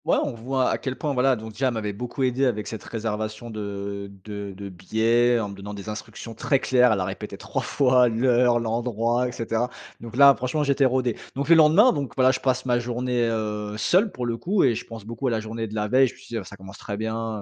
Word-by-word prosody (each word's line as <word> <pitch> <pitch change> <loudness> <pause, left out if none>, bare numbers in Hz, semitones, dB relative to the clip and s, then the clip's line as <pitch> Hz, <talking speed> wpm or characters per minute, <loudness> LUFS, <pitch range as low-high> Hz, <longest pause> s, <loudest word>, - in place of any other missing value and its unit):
Ouais. - - +3
On - - -2
voit 130 +3 -1
à - - 0
quel 130 -1 -4
point, 145 +1 -2
voilà, 130 0 +3
donc, 110 -1 -8
déjà, 130 +5 0
m'avait 110 -4 -3
beaucoup 125 +5 -4
aidé 130 +1 +1
avec 105 -4 -2
cette 110 - -6
réservation 110 0 -4
de 100 -1 -5
de 100 -1 -6
de 100 0 -7
billets, 115 +6 +2
en 105 -3 -3
me - - -8
donnant 100 +1 -8
des 100 +1 -7
instructions 110 +2 -7
très 140 - +1
claires. 125 -2 +4
Elle 105 - +1
a 95 - -1
répété 95 +1 -6
3 - - -3
fois 125 -3 +3
l'heure, 120 +1 +3
l'endroit 120 +1 0
et - - -4
cetera. 115 0 -2 0.3
Donc, 115 0 -9
là, 140 +1 +8
franchement, 130 +4 -1
j'étais 140 -1 +2
rodé. 125 -2 +1 0.2
Donc, 140 +2 -3
le 170 - +8
lendemain, 165 +10 +6
donc, 140 -4 -4
voilà, 130 -1 +5
je 130 - -2
passe 130 -1 0
ma 120 -1 +2
journée, 120 0 -1
heu, 105 -2 -3
seul 190 - +2
pour 125 - -4
le 115 -1 -2
coup 190 - +1
et 125 - +4
je - - -5
pense 115 -3 -9
beaucoup 115 +4 -4
à - - +1
la 115 - 0
journée 110 +1 -5
de 105 - -8
la 105 -1 -1
veille. 130 +4 +4
Je - - -8
me - - -20
suis - - -16
dit: 115 - -3
«Heu, - - -4
ça 100 - -11
commence 95 +1 -12
très 100 - -5
bien, 110 0 -3
115 Hz, 250 wpm, -24 LUFS, 110-130 Hz, 0.3 s, là